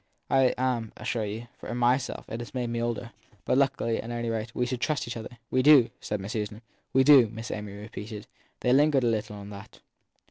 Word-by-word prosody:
I 135 -1 +4
am, 125 -3 -1
I - - -10
assure 115 -2 -1
you, 110 +3 -5
for 120 - -5
myself 125 +2 +1
it 115 - -5
has 120 +2 -8
made 120 -2 -1
me 115 0 -1
older. 120 0 -3 0.3
But, 130 - +3
luckily, 130 -4 +1
at 115 - -8
any 120 -1 -2
rate, 115 +1 -4
we 125 - +1
trust 130 +3 -1
each 120 - -4
other. 115 +1 -8
We 130 - +3
do, 130 -4 +7
said 105 - -3
Miss 100 +2 -6
Susan. 105 +1 -4 0.3
We 130 - +5
do, 135 -5 +8
Miss 110 +1 -7
Amy 105 -1 -5
repeated 105 0 -8 0.4
they 125 - +3
lingered 145 -1 +4
a - - +3
little 110 -1 -1
on 100 0 -9
that. 100 +2 -11
120 Hz, 215 wpm, -27 LUFS, 110-125 Hz, 0.4 s, do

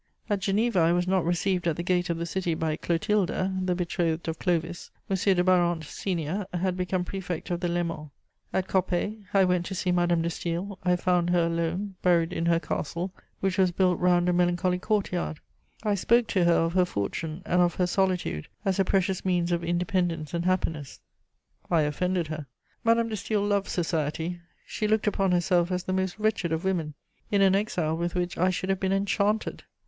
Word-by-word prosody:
At 205 - +2
Geneva, 200 +2 +1
I 165 +1 +4
was 175 0 +1
not 185 -2 +2
received 175 +1 0
at 165 - +1
the 170 - -4
gate 180 0 +1
of 170 - 0
the 170 - -3
city 175 -1 -1
by 160 -1 -1
Clotilda, 185 +3 0
the 180 -1 0
betrothed 170 -2 -1
of 160 - -3
Clovis: 175 -1 -1 0.2
M. - - +3
de 185 -1 +2
Barante, 175 -3 +3
senior, 180 +3 -3
had 180 +1 0
become 180 0 -1
Prefect 180 -2 -5
of 175 - 0
the 175 - -1
Léman. 170 -3 -2 0.4
At 190 0 -1
Coppet, 190 +3 0
I 195 -1 +5
went 180 -1 +1
to 190 - -4
see 180 0 0
Madame 175 -1 +2
de 170 - 0
Staël: 175 +4 -3
I 180 -1 +2
found 175 -1 +1
her 175 -1 +3
alone, 170 +4 -2
buried 175 -1 +3
in 170 - -1
her 170 -1 +4
castle, 175 +3 -3 0.3
which 195 0 0
was 185 -1 +4
built 180 0 +2
round 175 0 +3
a 180 - +3
melancholy 180 +1 +1
court 210 +1 0
yard. 175 -3 -3 0.4
I 210 -2 +1
spoke 235 +5 +3
to 185 -3 +2
her 170 - +5
of 165 0 +1
her 185 -1 +4
fortune 160 - -4
and 180 +1 +2
of 175 -1 +2
her 180 - +2
solitude 180 - 0 0.2
as 195 -1 +1
a - - +5
precious 190 0 0
means 180 -2 +1
of 170 0 0
independence 175 -2 -1
and 170 0 -1
happiness: 160 -6 -1 0.7
I 170 -3 +3
offended 175 +4 0
her. 155 -2 -5 0.4
Madame 230 0 +3
de - - -5
Staël 205 0 -1
loved 200 -1 +1
society; 165 0 -2 0.3
she 215 - -2
looked 215 0 +2
upon 195 -2 +1
herself 175 0 +2
as 180 0 -1
the 185 - -2
most 190 0 -1
wretched 215 -6 0
of 160 +1 -1
women, 170 -6 -1 0.3
in 200 -1 +3
an 190 -1 +5
exile 180 -6 0
with 170 +1 -2
which 175 -1 -1
I 185 +2 +2
should 185 +1 -2
have 190 -1 +1
been 190 0 0
enchanted. 200 +2 0
180 Hz, 200 wpm, -27 LUFS, 170-190 Hz, 0.7 s, I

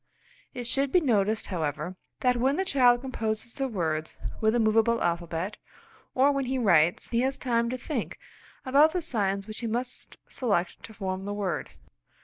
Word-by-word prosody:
It 245 -1 -4
should 275 +3 0
be 360 - +5
noticed, 220 - +1
however, 160 +2 -2 0.3
that 250 -1 +3
when 260 +4 +2
the 380 +3 0
child 245 -7 +4
composes 225 -3 -3
the 270 -2 -2
words 160 -8 -2 0.2
with 220 0 +3
the 240 - +2
movable 225 +1 +3
alphabet, 170 +3 -2 0.6
or 270 +2 +5
when 275 -1 -1
he 260 +1 -1
writes, 175 -8 +3
he 230 - +2
has 265 +1 0
time 235 -2 0
to 255 - -2
think 250 -1 -4 0.5
about 285 +4 +5
the 360 -2 -1
signs 200 - -1
which 215 0 -6
he 235 - -3
must 245 +3 -4
select 200 -8 -1
to 220 - -12
form 190 -1 -3
the 205 0 -3
word. 195 -5 -2
230 Hz, 175 wpm, -27 LUFS, 195-260 Hz, 0.6 s, be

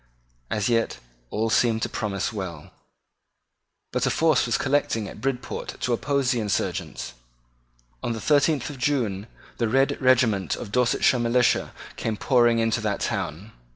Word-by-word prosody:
As 105 -2 0
Yet 115 - +1 0.3
all 110 - -1
seemed 115 -1 +2
to - - +1
promise 100 0 -3
well. 90 -7 -6 1.2
But - - 0
a - - +3
force 160 -1 +3
was - - +1
collecting 130 -6 0
at - - -10
Bridport 130 -2 -4
to 125 - +1
oppose 140 +1 +1
the 120 - 0
insurgents. 65 - -2 0.9
On 120 - -2
the 115 - -5
thirteenth 150 +3 +2
of 140 - -10
June 115 -7 0 0.3
the 115 - +2
red 135 +4 +2
regiment 120 -8 +3
of 100 - -8
Dorsetshire 125 +1 +3
militia 120 +1 +2 0.3
came 110 -2 -2
pouring 120 0 +3
into 115 0 +1
that 105 -2 -2
town. 100 +9 -3
115 Hz, 150 wpm, -25 LUFS, 105-130 Hz, 1.2 s, a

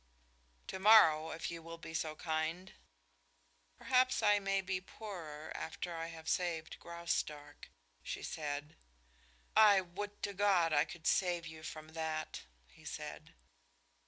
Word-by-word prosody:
"To 190 - -5
morrow, 175 -7 +7
if 165 - -4
you 170 -1 -6
will 165 +1 -8
be 160 - -9
so 160 -1 -2
kind." 160 +4 -2 1.0
"Perhaps 255 -2 +3
I 205 -1 +5
may 195 0 +1
be 190 -1 -2
poorer 170 -7 -8
after 170 +2 -4
I 165 0 -3
have 160 -1 -10
saved 170 -3 -1
Graustark," 170 -3 -4 0.3
she - - -5
said. 145 -1 -4 0.8
"I 210 -3 +8
would 205 +3 -6
to 200 - -1
God 185 -5 +3
I 145 - +4
could 170 -2 -11
save 175 -3 +2
you 160 -1 -9
from 155 0 -8
that!" 160 -1 -3 0.2
he - - -20
said. - - -7
165 Hz, 135 wpm, -35 LUFS, 160-190 Hz, 1.0 s, I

